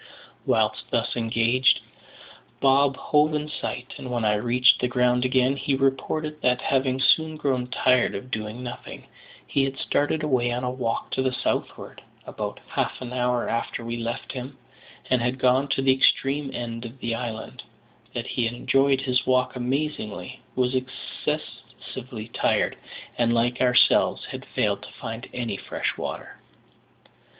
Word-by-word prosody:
Whilst -, -, +1 dB
thus -, -, 0 dB
engaged, 120 Hz, +2 st, +3 dB, 0.8 s
Bob 135 Hz, 0 st, +4 dB
hove 150 Hz, +1 st, +3 dB
in 150 Hz, 0 st, -2 dB
sight, 130 Hz, -4 st, -5 dB
and 130 Hz, -, -6 dB
when 120 Hz, -2 st, -1 dB
I 105 Hz, -, +4 dB
reached 120 Hz, +4 st, +4 dB
the 125 Hz, -, +2 dB
ground 125 Hz, 0 st, +2 dB
again 130 Hz, +1 st, +3 dB
he 140 Hz, 0 st, 0 dB
reported 150 Hz, +3 st, 0 dB
that, 125 Hz, 0 st, +3 dB
having 130 Hz, -1 st, +1 dB
soon 160 Hz, +3 st, +3 dB
grown 130 Hz, -4 st, 0 dB
tired 125 Hz, 0 st, +3 dB
of 125 Hz, +6 st, -7 dB
doing 110 Hz, +3 st, -4 dB
nothing, 125 Hz, 0 st, -8 dB, 0.4 s
he 140 Hz, -, +1 dB
had 135 Hz, 0 st, -2 dB
started 145 Hz, +3 st, 0 dB
away 125 Hz, -5 st, +2 dB
on 125 Hz, +1 st, -2 dB
a 125 Hz, -, 0 dB
walk 125 Hz, -3 st, -2 dB
to 130 Hz, -, 0 dB
the 130 Hz, 0 st, +1 dB
southward, 125 Hz, -, -3 dB, 0.2 s
about -, -, -5 dB
half -, -, -2 dB
an 125 Hz, -1 st, -6 dB
hour 125 Hz, -1 st, +1 dB
after 115 Hz, 0 st, -2 dB
we 115 Hz, 0 st, -3 dB
left 115 Hz, +2 st, -4 dB
him, 130 Hz, +1 st, -7 dB, 0.5 s
and 130 Hz, -2 st, +4 dB
had 125 Hz, +2 st, 0 dB
gone 130 Hz, +2 st, +3 dB
to 135 Hz, -, 0 dB
the 135 Hz, -1 st, +5 dB
extreme 135 Hz, +2 st, +2 dB
end 115 Hz, -1 st, -5 dB
of 120 Hz, +2 st, -8 dB
the 115 Hz, -2 st, -2 dB
island; 115 Hz, -2 st, -5 dB, 0.5 s
that -, -, -3 dB
he 120 Hz, -, -1 dB
had 115 Hz, +1 st, -2 dB
enjoyed 135 Hz, +2 st, +3 dB
his 125 Hz, -1 st, 0 dB
walk 130 Hz, 0 st, +2 dB
amazingly, 130 Hz, -3 st, -3 dB, 0.2 s
was 125 Hz, 0 st, +1 dB
excessively 130 Hz, -2 st, -5 dB
tired, -, -, +1 dB, 0.4 s
and, 120 Hz, 0 st, +3 dB
like 120 Hz, +1 st, +1 dB
ourselves, 125 Hz, -1 st, +4 dB
had -, -, -7 dB
failed -, -, +1 dB
to -, -, -11 dB
find 115 Hz, +2 st, -7 dB
any 115 Hz, -5 st, -3 dB
fresh -, -, -3 dB
water. -, -, -6 dB
125 Hz, 160 wpm, -25 LUFS, 120-135 Hz, 0.8 s, the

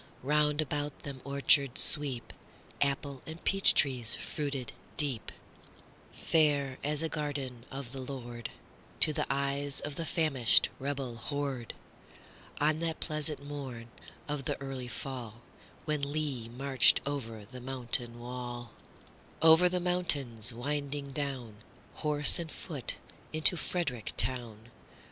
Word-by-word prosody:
Round 150 Hz, +2 st, +2 dB
about 145 Hz, -1 st, -4 dB
them 135 Hz, -2 st, -7 dB
orchards 140 Hz, -1 st, +3 dB
sweep, 140 Hz, -5 st, +2 dB, 0.5 s
Apple 140 Hz, -1 st, -1 dB
and 160 Hz, +2 st, -8 dB
peach 195 Hz, 0 st, +5 dB
tree 130 Hz, -4 st, +3 dB
fruited 135 Hz, +3 st, -1 dB, 0.2 s
deep, 135 Hz, -7 st, -1 dB, 0.8 s
Fair 145 Hz, -4 st, +1 dB
as 150 Hz, +2 st, 0 dB
a -, -, +1 dB
garden 140 Hz, -6 st, -4 dB
of 135 Hz, -3 st, -7 dB
the 135 Hz, -, -7 dB
LordTo 125 Hz, +3 st, -1 dB
the -, -, -1 dB
eyes 140 Hz, +1 st, 0 dB
of 145 Hz, -1 st, -6 dB
the 165 Hz, -, -2 dB
famished 140 Hz, -8 st, +3 dB
rebel 135 Hz, -3 st, -3 dB
horde, 140 Hz, -2 st, -4 dB, 0.8 s
On 155 Hz, +1 st, +2 dB
that 165 Hz, -1 st, -2 dB
pleasant 150 Hz, -2 st, -3 dB
morn 130 Hz, -5 st, -7 dB, 0.4 s
of 145 Hz, -3 st, -3 dB
the -, -, -2 dB
early 135 Hz, -2 st, -5 dB
fallWhen 125 Hz, +4 st, -6 dB
Lee 140 Hz, -5 st, -2 dB
marched 130 Hz, +2 st, +4 dB
over 115 Hz, -7 st, -4 dB
the 125 Hz, +4 st, -10 dB
mountain 120 Hz, -2 st, -2 dB
wall,—Over 125 Hz, +7 st, 0 dB
the 180 Hz, 0 st, 0 dB
mountains 145 Hz, -, +3 dB
winding 140 Hz, +3 st, -3 dB
down, 130 Hz, -7 st, -4 dB, 0.4 s
Horse 150 Hz, 0 st, +4 dB
and 165 Hz, -2 st, -5 dB
foot, 145 Hz, -8 st, -3 dB, 0.4 s
into 155 Hz, +3 st, +9 dB
Frederick 155 Hz, -10 st, -3 dB
town. 120 Hz, -3 st, -1 dB
140 Hz, 115 wpm, -31 LUFS, 125-150 Hz, 0.8 s, into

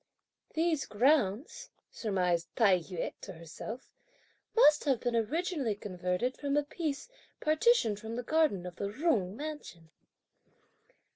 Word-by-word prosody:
"These 320 Hz, -2 st, +1 dB
grounds," 235 Hz, -, +1 dB, 0.2 s
surmised 180 Hz, -5 st, 0 dB
Tai 200 Hz, -7 st, +5 dB
yü 175 Hz, 0 st, -4 dB
to 190 Hz, -, -8 dB
herself, 170 Hz, +9 st, -8 dB, 0.6 s
"must 305 Hz, -11 st, +6 dB
have 270 Hz, -5 st, +2 dB
been 245 Hz, -1 st, -1 dB
originally 275 Hz, -, 0 dB
converted 185 Hz, +4 st, -2 dB
from 285 Hz, 0 st, -1 dB
a 295 Hz, -, +3 dB
piece 295 Hz, -, -4 dB, 0.3 s
partitioned 310 Hz, -, +3 dB
from 220 Hz, +2 st, -6 dB
the 245 Hz, -, -3 dB
garden 300 Hz, -, +2 dB
of 180 Hz, 0 st, -8 dB
the 200 Hz, -, -2 dB
Jung 215 Hz, -, 0 dB
mansion." 285 Hz, -, -7 dB
230 Hz, 125 wpm, -31 LUFS, 190-300 Hz, 0.6 s, must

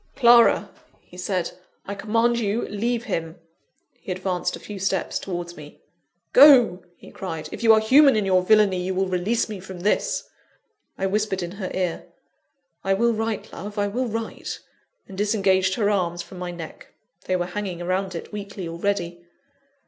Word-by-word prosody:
"Clara," 235 Hz, -2 st, +5 dB, 0.3 s
he -, -, -18 dB
said, 180 Hz, -1 st, -2 dB, 0.3 s
"I 200 Hz, -, -4 dB
command 230 Hz, +4 st, +1 dB
you, 215 Hz, +1 st, -1 dB
leave 235 Hz, +3 st, -1 dB
him!" 165 Hz, -8 st, -3 dB, 0.6 s
He -, -, -7 dB
advanced 185 Hz, -1 st, -2 dB
a -, -, -10 dB
few 205 Hz, -2 st, -8 dB
steps 190 Hz, -1 st, -1 dB
towards 175 Hz, -2 st, -5 dB
me. 150 Hz, -2 st, -12 dB, 0.5 s
"Go!" 250 Hz, -9 st, +7 dB, 0.2 s
he -, -, -14 dB
cried; 160 Hz, -5 st, -6 dB
"if -, -, -7 dB
you 225 Hz, -1 st, +6 dB
are 220 Hz, -, +7 dB
human 270 Hz, +5 st, +6 dB
in 210 Hz, -2 st, +1 dB
your 185 Hz, -1 st, +3 dB
villany, 200 Hz, -1 st, +3 dB
you 185 Hz, +1 st, -2 dB
will 190 Hz, +1 st, +1 dB
release 185 Hz, +6 st, 0 dB
me 210 Hz, -3 st, -6 dB
from 185 Hz, -1 st, -9 dB
this!" 205 Hz, +3 st, 0 dB, 0.7 s
I 190 Hz, -, -1 dB
whispered 195 Hz, -1 st, -1 dB
in 175 Hz, -, -5 dB
her 195 Hz, -1 st, -5 dB
ear, 180 Hz, -3 st, -2 dB, 0.8 s
"I 195 Hz, 0 st, +2 dB
will 235 Hz, +3 st, +2 dB
write, 225 Hz, -1 st, -3 dB
love 205 Hz, +2 st, -8 dB
I 205 Hz, 0 st, +1 dB
will 250 Hz, +5 st, -2 dB
write," 225 Hz, 0 st, -5 dB, 0.5 s
and 195 Hz, -, -10 dB
disengaged 190 Hz, -2 st, +2 dB
her 210 Hz, -2 st, +1 dB
arms 175 Hz, -3 st, -1 dB
from 185 Hz, -, -12 dB
my 180 Hz, -1 st, -4 dB
neck 170 Hz, -2 st, -10 dB, 0.3 s
they 185 Hz, -, 0 dB
were 175 Hz, -1 st, 0 dB
hanging 185 Hz, 0 st, -4 dB
round 185 Hz, 0 st, -1 dB
it 165 Hz, -, -7 dB
weakly, 200 Hz, -3 st, -6 dB
already! 175 Hz, 0 st, -2 dB
195 Hz, 170 wpm, -23 LUFS, 180-215 Hz, 0.8 s, Go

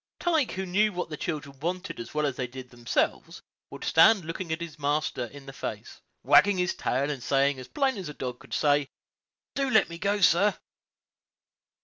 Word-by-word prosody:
Tige, 320 Hz, -7 st, +1 dB
who 190 Hz, +1 st, -3 dB
knew 210 Hz, +4 st, +2 dB
what 180 Hz, -2 st, -3 dB
the -, -, -3 dB
children 140 Hz, -4 st, -5 dB
wanted 180 Hz, +5 st, -4 dB
as 115 Hz, -, -7 dB
well 150 Hz, 0 st, 0 dB
as 140 Hz, -3 st, -1 dB
they 125 Hz, -1 st, -3 dB
did 125 Hz, 0 st, -10 dB
themselves, 120 Hz, -1 st, -2 dB, 0.3 s
would -, -, -9 dB
stand 185 Hz, +2 st, +5 dB
looking 165 Hz, +2 st, -5 dB
his 160 Hz, -1 st, -5 dB
master 145 Hz, -3 st, -1 dB
in 140 Hz, +3 st, -12 dB
the 135 Hz, -, -9 dB
face, -, -, -7 dB, 0.2 s
wagging 205 Hz, -1 st, +5 dB
his 180 Hz, -1 st, +1 dB
tail, 140 Hz, +3 st, -1 dB
and 140 Hz, -4 st, -5 dB
saying, 135 Hz, +1 st, +2 dB
as 130 Hz, -, -9 dB
plain 270 Hz, -5 st, 0 dB
as 185 Hz, -5 st, -5 dB
a 150 Hz, -, -8 dB
dog 125 Hz, -1 st, -5 dB
could 135 Hz, -, -7 dB
say, 145 Hz, -2 st, +2 dB, 0.6 s
"Do 275 Hz, -1 st, 0 dB
let 220 Hz, -7 st, +4 dB
me 170 Hz, 0 st, -8 dB
go, 200 Hz, +2 st, 0 dB
sir." 195 Hz, +3 st, +4 dB
155 Hz, 195 wpm, -27 LUFS, 135-190 Hz, 0.6 s, stand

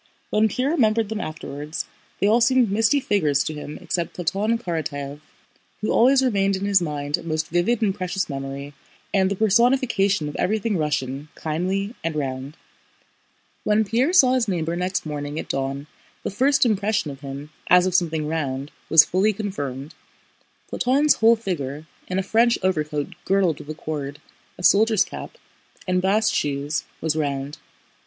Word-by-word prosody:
When 215 Hz, +1 st, +4 dB
Pierre 255 Hz, +7 st, -1 dB
remembered 225 Hz, -8 st, +2 dB
them 220 Hz, -1 st, -3 dB
afterwards 150 Hz, -1 st, -5 dB, 0.3 s
they -, -, +1 dB
all 225 Hz, +4 st, +4 dB
seemed 245 Hz, -2 st, +4 dB
misty 225 Hz, +7 st, +3 dB
figures 155 Hz, -, +1 dB
to 155 Hz, -, -4 dB
him 150 Hz, 0 st, -7 dB
except 170 Hz, -2 st, -3 dB
Platón 200 Hz, +6 st, 0 dB
Karatáev, 145 Hz, -6 st, -4 dB, 0.6 s
who 215 Hz, -, 0 dB
always 265 Hz, +3 st, +5 dB
remained 195 Hz, -5 st, +2 dB
in 190 Hz, +1 st, -3 dB
his 200 Hz, -2 st, +4 dB
mind 145 Hz, -3 st, -2 dB
a -, -, -10 dB
most 155 Hz, -1 st, -2 dB
vivid 190 Hz, +8 st, +1 dB
and 200 Hz, -3 st, +2 dB
precious 190 Hz, 0 st, -2 dB
memory 140 Hz, 0 st, -6 dB, 0.4 s
and 190 Hz, -1 st, +3 dB
the 200 Hz, -, -1 dB
personification 220 Hz, -, +2 dB
of 150 Hz, -, -6 dB
everything 215 Hz, +2 st, 0 dB
Russian, 145 Hz, -3 st, -2 dB
kindly, 185 Hz, +7 st, -2 dB
and 165 Hz, -1 st, -2 dB
round. 135 Hz, +1 st, -4 dB, 1.1 s
When 215 Hz, +1 st, +2 dB
Pierre 240 Hz, -, +1 dB
saw 265 Hz, -9 st, +6 dB
his 250 Hz, -3 st, +1 dB
neighbor 170 Hz, -3 st, -1 dB
next 180 Hz, +1 st, -2 dB
morning 145 Hz, -1 st, -4 dB
at -, -, -4 dB
dawn 135 Hz, +1 st, -2 dB, 0.4 s
the -, -, -3 dB
first 270 Hz, +7 st, +3 dB
impression 205 Hz, -7 st, 0 dB
of 135 Hz, 0 st, -11 dB
him, 140 Hz, +2 st, -7 dB, 0.2 s
as 180 Hz, 0 st, +6 dB
of 185 Hz, -, -1 dB
something 160 Hz, -4 st, +1 dB
round, 140 Hz, -3 st, -3 dB, 0.2 s
was 160 Hz, -2 st, +8 dB
fully 195 Hz, +4 st, +2 dB
confirmed: 145 Hz, -9 st, -5 dB, 0.8 s
Platón's 280 Hz, +4 st, +3 dB
whole 225 Hz, +1 st, +6 dB
figure—in 165 Hz, -3 st, -5 dB
a 190 Hz, -, +1 dB
French 230 Hz, +4 st, +3 dB
overcoat 150 Hz, -5 st, -1 dB
girdled 190 Hz, -5 st, +1 dB
with 145 Hz, -, -11 dB
a 155 Hz, -, -4 dB
cord, 145 Hz, -2 st, -4 dB, 0.4 s
a 180 Hz, -, -9 dB
soldier's 215 Hz, +2 st, +5 dB
cap, -, -, -9 dB, 0.5 s
and 180 Hz, 0 st, +1 dB
bast 210 Hz, +3 st, +2 dB
shoes—was 150 Hz, +2 st, -2 dB
round. 140 Hz, -1 st, -3 dB
180 Hz, 160 wpm, -23 LUFS, 150-215 Hz, 1.1 s, was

